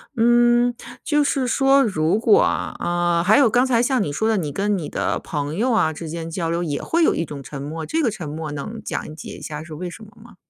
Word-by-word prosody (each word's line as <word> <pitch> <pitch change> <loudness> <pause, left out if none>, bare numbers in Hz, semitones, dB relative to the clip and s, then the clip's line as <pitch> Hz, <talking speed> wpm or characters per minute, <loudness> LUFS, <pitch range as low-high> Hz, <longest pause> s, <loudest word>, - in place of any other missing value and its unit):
嗯， 240 +1 +4 0.3
就 295 -1 +2
是 275 -2 0
说 270 +3 +4
如 180 -3 +1
果 415 - +5
啊， - - -1
啊 175 -1 0
还 210 +7 +5
有 270 -5 +5
刚 245 +4 +3
才 240 -3 +2
像 250 -2 +1
你 145 - -3
说 220 +10 0
的， 220 - +2
你 155 -6 -2
跟 200 +4 0
你 160 -5 -5
的 - - -1
朋 150 0 -4
友 240 +7 +1
啊 190 -9 +2
之 160 +1 -7
间 165 +1 -5
交 165 0 -2
流， 170 +1 -1
也 150 -5 -2
会 335 +1 +1
有 - - +3
一 165 - -1
种 145 -2 -8
沉 140 +1 -8
默， 155 +4 -5
这 320 - -1
个 240 - +2
沉 175 -8 -6
默 155 0 -5
能 180 +11 -6
讲 155 - -4
解 155 - -9
一 - - -15
下 150 0 -6
是 160 0 -10
为 175 +4 -5
什 220 +5 -11
么 210 - -14
吗？ 235 - -16
185 Hz, 275 characters per minute, -22 LUFS, 160-240 Hz, 0.3 s, 果